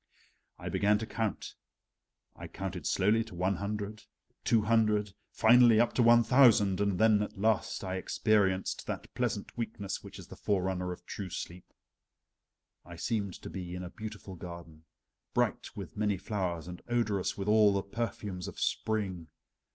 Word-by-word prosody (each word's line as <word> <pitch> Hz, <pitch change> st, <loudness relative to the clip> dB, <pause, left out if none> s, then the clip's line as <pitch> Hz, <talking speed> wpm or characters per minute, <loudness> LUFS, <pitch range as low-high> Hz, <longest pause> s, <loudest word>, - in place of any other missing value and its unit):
I -, -, -8 dB
began 105 Hz, +1 st, +2 dB
to 110 Hz, -, -4 dB
count: 110 Hz, -2 st, -3 dB, 0.8 s
I -, -, -8 dB
counted 95 Hz, -4 st, -5 dB
slowly 105 Hz, +4 st, +3 dB
to 110 Hz, -, -11 dB
one 90 Hz, +2 st, 0 dB
hundred, 105 Hz, +2 st, -4 dB, 0.4 s
two 115 Hz, -2 st, +3 dB
hundred, 105 Hz, -2 st, +2 dB, 0.2 s
finally 120 Hz, -1 st, +6 dB
up 120 Hz, -, +3 dB
to -, -, +2 dB
one 120 Hz, 0 st, +6 dB
thousand, 110 Hz, -6 st, +5 dB
and 100 Hz, -3 st, +1 dB
then 110 Hz, 0 st, +4 dB
at 105 Hz, -, -4 dB
last 110 Hz, +1 st, 0 dB
I 95 Hz, -1 st, -3 dB
experienced 95 Hz, -1 st, +1 dB
that -, -, -5 dB
pleasant -, -, -2 dB
weakness 110 Hz, -4 st, -4 dB
which -, -, -10 dB
is -, -, -10 dB
the -, -, -11 dB
forerunner 95 Hz, -2 st, -1 dB
of 90 Hz, -, -9 dB
true 100 Hz, -3 st, -6 dB
sleep. 90 Hz, 0 st, -7 dB, 1.1 s
I 85 Hz, -, -11 dB
seemed 100 Hz, 0 st, -2 dB
to -, -, -6 dB
be 90 Hz, -2 st, -6 dB
in 90 Hz, -, -5 dB
a 90 Hz, -, -7 dB
beautiful 105 Hz, -3 st, -8 dB
garden, 85 Hz, -3 st, -10 dB, 0.5 s
bright -, -, 0 dB
with -, -, -8 dB
many 105 Hz, -2 st, 0 dB
flowers 90 Hz, -4 st, -3 dB
and 90 Hz, 0 st, -8 dB
odorous 110 Hz, -5 st, 0 dB
with 100 Hz, 0 st, -4 dB
all 105 Hz, -1 st, +6 dB
the 100 Hz, -1 st, 0 dB
perfumes 100 Hz, -4 st, -4 dB
of -, -, -8 dB
spring. 95 Hz, -6 st, -1 dB
100 Hz, 160 wpm, -31 LUFS, 95-110 Hz, 1.1 s, finally